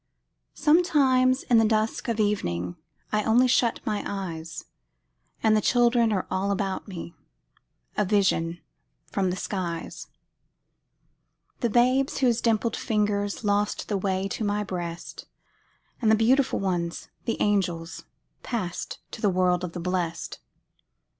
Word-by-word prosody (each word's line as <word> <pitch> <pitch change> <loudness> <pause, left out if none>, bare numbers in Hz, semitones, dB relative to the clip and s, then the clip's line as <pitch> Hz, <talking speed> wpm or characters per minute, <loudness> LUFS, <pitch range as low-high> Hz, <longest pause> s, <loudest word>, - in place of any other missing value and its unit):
Sometimes, 275 -6 +3
in 235 -2 +4
the - - +5
dusk 220 +3 0
of 230 -2 -1
evening, 90 - 0 0.4
I 215 - +2
only 240 +4 +4
shut 240 -2 +2
my 210 -1 -1
eyes, 170 -5 -5 0.8
And 220 -1 +5
the 215 - +3
children 240 0 +3
are 190 -3 0
all 190 +2 0
about 195 0 -2
me, 170 -3 -7 0.8
A - - +2
vision 180 -4 +1 0.5
from 190 -2 +1
the 180 - -1
skies: 180 -3 -4 1.5
The 235 - +1
babes 255 +4 +3
whose 245 -3 +2
dimpled 230 0 +1
fingers 205 -1 -1
Lost 205 0 0
the 205 - +1
way 190 0 -1
to 220 - -3
my 205 0 0
breast, 175 -3 -6 0.7
And 220 - +3
the 220 - +6
beautiful 255 +5 +3
ones, 175 -3 -2 0.2
the 230 - -1
angels, 175 -5 -1 0.4
Passed 195 -8 -4
to 220 - -8
the 205 - +3
world 180 -1 +2
of 175 -2 -4
the 175 - -5
blest. 175 -1 -3
205 Hz, 135 wpm, -26 LUFS, 180-230 Hz, 1.5 s, the